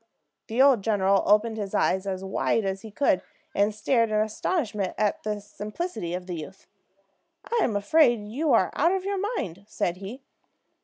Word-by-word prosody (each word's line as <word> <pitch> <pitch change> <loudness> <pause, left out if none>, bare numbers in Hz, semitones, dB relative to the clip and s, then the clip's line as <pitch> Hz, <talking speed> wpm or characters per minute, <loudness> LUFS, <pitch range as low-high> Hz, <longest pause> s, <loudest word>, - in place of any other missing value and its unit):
The 240 +4 +3
old 270 -6 +5
general 195 -2 +2
opened 220 +2 +3
his 200 -2 -4
eyes 190 +1 +1
as 190 -1 -3
wide 195 +2 0
as 195 0 -2
he 220 - -9
could, 210 -2 +2 0.3
and 205 +1 +2
stared 230 +2 +1
in 215 - -1
astonishment 215 - -1
at 210 -1 0
the 210 -1 -3
simplicity 210 - -5
of 180 0 -6
the 180 - -5
youth. 170 +4 -8 1.0
"I'm 220 - +1
afraid 235 +1 +3
you 285 +8 -1
are - - +4
out 335 +5 +2
of 380 -1 -2
your 400 -1 -1 0.2
mind," 190 - -4
said 175 -4 -2
he. 210 +8 -8
210 Hz, 170 wpm, -26 LUFS, 195-245 Hz, 1.0 s, old